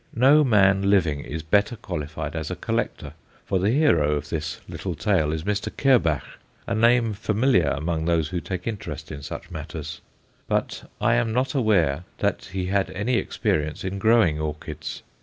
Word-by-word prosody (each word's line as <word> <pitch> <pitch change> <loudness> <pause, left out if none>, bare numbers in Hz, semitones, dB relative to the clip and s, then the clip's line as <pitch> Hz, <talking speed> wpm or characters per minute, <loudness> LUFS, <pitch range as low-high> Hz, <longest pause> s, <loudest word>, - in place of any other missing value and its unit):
No 140 +6 +6
man 100 -5 +4
living 85 -8 +3
is 75 +2 -6
better 100 +8 +2
qualified 75 -6 -5
as 80 -2 -3
a - - -3
collector, - - -3 0.3
for 95 - 0
the 95 +3 +2
hero 90 - +3
of 75 0 -3
this 80 -1 -3
little - - -5
tale 75 -1 +1
is 80 0 -3
Mr. 105 +1 -1
Kerbach, 110 - +2 0.3
a - - -2
name 115 0 +3
familiar 105 - +2
among 80 +3 -1
those 80 -3 +1
who 90 -1 -3
take 90 -2 -5
interest 110 -4 -5
in 75 -2 -7
such - - -8
matters; 75 0 -7 0.5
but - - -2
I 120 - +3
am 115 -1 +1
not 130 +2 0
aware 90 - +2
that - - -1
he 95 0 -4
had 95 +1 0
any 115 +6 0
experience 75 -7 -1
in 95 +1 -3
growing 110 -8 +4
orchids. 75 -1 -5
95 Hz, 170 wpm, -24 LUFS, 80-110 Hz, 0.5 s, No